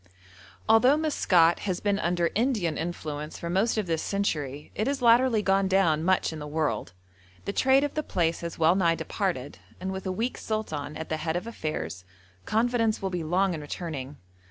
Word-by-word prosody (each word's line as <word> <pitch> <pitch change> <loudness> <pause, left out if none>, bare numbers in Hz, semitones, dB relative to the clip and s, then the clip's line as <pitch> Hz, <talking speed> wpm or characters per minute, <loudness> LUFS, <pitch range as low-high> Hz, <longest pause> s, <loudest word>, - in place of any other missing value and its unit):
Although 250 +6 +5
Maskat 180 - +3
has 185 -3 -2
been 205 -1 0
under 175 -2 0
Indian 215 - 0
influence 155 -2 -5
for 170 - -5
most 205 +6 +1
of 215 - 0
this 165 -2 -1
century, 150 -8 -2
it 215 - -1
has 275 -2 -1
latterly 235 -1 +5
gone 195 0 +2
down 175 -5 +2
much 185 -2 +2
in 160 - -6
the 150 - -6
world; 145 - -2 0.5
the 200 - -2
trade 265 +4 +4
of 290 - -2
the 305 - -1
place 170 - -1
has 170 -1 -5
well 165 +1 +4
nigh 170 -3 +2
departed, 160 - -3 0.2
and 190 +1 -3
with 190 0 -5
a - - 0
weak 230 +7 -2
sultan 155 -10 -4
at 160 - -6
the 155 - -1
head 160 +1 -2
of 180 - -2
affairs, 95 - -4 0.4
confidence 230 -1 +1
will 190 -1 -3
be 175 -2 -2
long 180 +4 +1
in 155 - -5
returning. 145 -3 -6
180 Hz, 190 wpm, -27 LUFS, 160-215 Hz, 0.5 s, Although